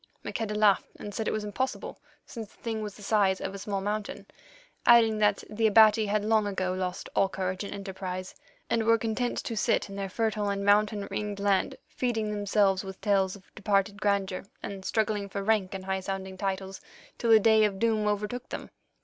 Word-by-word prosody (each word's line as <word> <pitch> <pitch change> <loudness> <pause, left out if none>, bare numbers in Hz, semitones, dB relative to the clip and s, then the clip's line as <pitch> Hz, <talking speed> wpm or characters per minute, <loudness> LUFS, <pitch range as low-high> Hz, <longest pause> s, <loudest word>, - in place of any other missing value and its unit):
Maqueda 215 -2 -3
laughed 210 -2 +4
and 205 - -7
said 220 - -3
it - - +1
was 215 - -2
impossible, 250 +6 -3 0.3
since 225 -4 -8
the - - -25
thing 225 -2 -2
was 210 -2 -5
the 210 - -12
size 200 -2 +2
of 190 - -4
a 200 - -7
small 195 0 -3
mountain, 210 +1 -3 0.6
adding 225 -2 +6
that 205 -1 +2
the 220 +1 +1
Abati 215 0 +6
had 210 0 0
long 215 -1 +3
ago 185 -2 -1
lost 185 -1 -3
all 195 - +3
courage 185 0 -3
and 200 - -6
enterprise, 190 -2 -5 0.3
and 230 - +1
were 230 +1 +4
content 230 +2 -2
to 230 - -4
sit 210 - +1
in - - -7
their 195 -1 -3
fertile 215 -1 -1
and 200 0 -2
mountain 205 0 +3
ringed 205 -1 -3
land, 200 -1 +1
feeding 225 -4 -2
themselves 205 -2 +2
with 190 -1 -8
tales 195 -2 +1
of 195 - -18
departed 200 0 0
grandeur 200 -2 0 0.2
and 195 -1 -6
struggling 210 -2 0
for 200 +1 -4
rank 200 -3 +1
and 190 -1 -6
high 190 0 -1
sounding 190 0 -5
titles, 190 0 -3 0.4
till 235 - 0
the 220 -1 +8
day 220 0 +5
of 205 -2 +1
doom 220 -1 +1
overtook 210 +4 -2
them. - - -7
205 Hz, 200 wpm, -28 LUFS, 195-215 Hz, 0.6 s, the